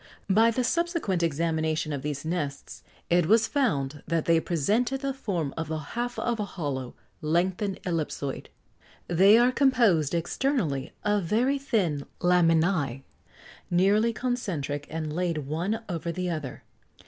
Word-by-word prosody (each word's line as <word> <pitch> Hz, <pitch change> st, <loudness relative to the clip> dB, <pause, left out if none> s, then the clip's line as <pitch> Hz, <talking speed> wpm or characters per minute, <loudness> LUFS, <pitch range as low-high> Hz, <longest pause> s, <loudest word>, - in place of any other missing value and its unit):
By 225 Hz, +4 st, +5 dB
the 250 Hz, +2 st, 0 dB
subsequent 335 Hz, -, 0 dB
examination 160 Hz, -1 st, 0 dB
of 140 Hz, -, -3 dB
these 145 Hz, +1 st, -4 dB
nests 150 Hz, -4 st, -4 dB, 0.3 s
it 175 Hz, -2 st, +4 dB
was 220 Hz, +2 st, +5 dB
found 150 Hz, -, 0 dB
that 165 Hz, -2 st, 0 dB
they 165 Hz, -1 st, +4 dB
presented 215 Hz, -, 0 dB
the 275 Hz, -1 st, -1 dB
form 180 Hz, -, -3 dB
of 165 Hz, 0 st, -3 dB
the 160 Hz, 0 st, -2 dB
half 240 Hz, +11 st, -4 dB
of 240 Hz, -2 st, -1 dB
a -, -, 0 dB
hollow, 145 Hz, -10 st, -4 dB, 0.3 s
lengthened 180 Hz, +5 st, 0 dB
ellipsoid. 155 Hz, -5 st, -3 dB, 0.6 s
They 195 Hz, +5 st, +6 dB
are 245 Hz, +2 st, +4 dB
composed, 230 Hz, -, +3 dB
externally, 170 Hz, -, -1 dB
of 205 Hz, -3 st, +1 dB
very 250 Hz, +10 st, +1 dB
thin 180 Hz, -, -1 dB
laminæ, 165 Hz, -6 st, +2 dB, 0.7 s
nearly 200 Hz, +6 st, +3 dB
concentric, 175 Hz, -, -3 dB
and 155 Hz, -1 st, -4 dB
laid 165 Hz, -4 st, -1 dB
one 185 Hz, +10 st, -2 dB
over 170 Hz, -2 st, -3 dB
the 180 Hz, +1 st, -2 dB
other. 150 Hz, -6 st, -5 dB
175 Hz, 135 wpm, -27 LUFS, 155-220 Hz, 0.7 s, They